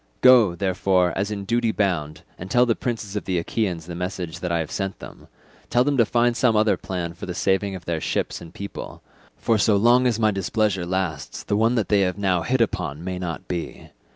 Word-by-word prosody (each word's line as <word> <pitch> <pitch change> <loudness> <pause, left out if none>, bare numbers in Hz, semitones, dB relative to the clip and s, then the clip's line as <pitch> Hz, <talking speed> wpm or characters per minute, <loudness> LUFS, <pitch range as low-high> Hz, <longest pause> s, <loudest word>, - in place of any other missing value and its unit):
Go, 120 -8 +6
therefore, 95 -1 +1
as 100 +2 -1
in 100 -2 -4
duty 115 +2 +1
bound, 85 -8 -1 0.2
and 95 - -7
tell 125 +4 +4
the 120 - +2
princes 110 -4 -4
of 105 - -3
the 95 -2 -1
Achaeans 85 -2 -2
the 85 - -7
message 90 -1 -4
that 90 0 -3
I 85 - +2
have 80 -2 -3
sent 95 -1 -3
them; - - -12 0.4
tell 120 +1 +3
them 145 +1 +1
to 115 -3 +4
find 120 0 +2
some 125 -3 +2
other 105 -2 +3
plan 85 -2 -4
for 85 - -9
the 90 - -4
saving 95 +1 0
of 90 -2 -9
their 85 -2 -2
ships - - -2
and 85 - -10
people, 100 0 -8 0.3
for 115 -2 +1
so 105 +1 +4
long 120 +5 +4
as 115 -3 +1
my 110 -1 +3
displeasure 95 -1 0
lasts 90 -4 -3
the - - -1
one 115 +3 +2
that 110 -4 0
they 105 -1 +4
have 90 -2 0
now 95 -3 +1
hit 125 +6 0
upon 90 -9 -1
may 90 0 -4
not 85 -3 -5
be. 85 -2 -5
95 Hz, 225 wpm, -23 LUFS, 90-110 Hz, 0.4 s, Go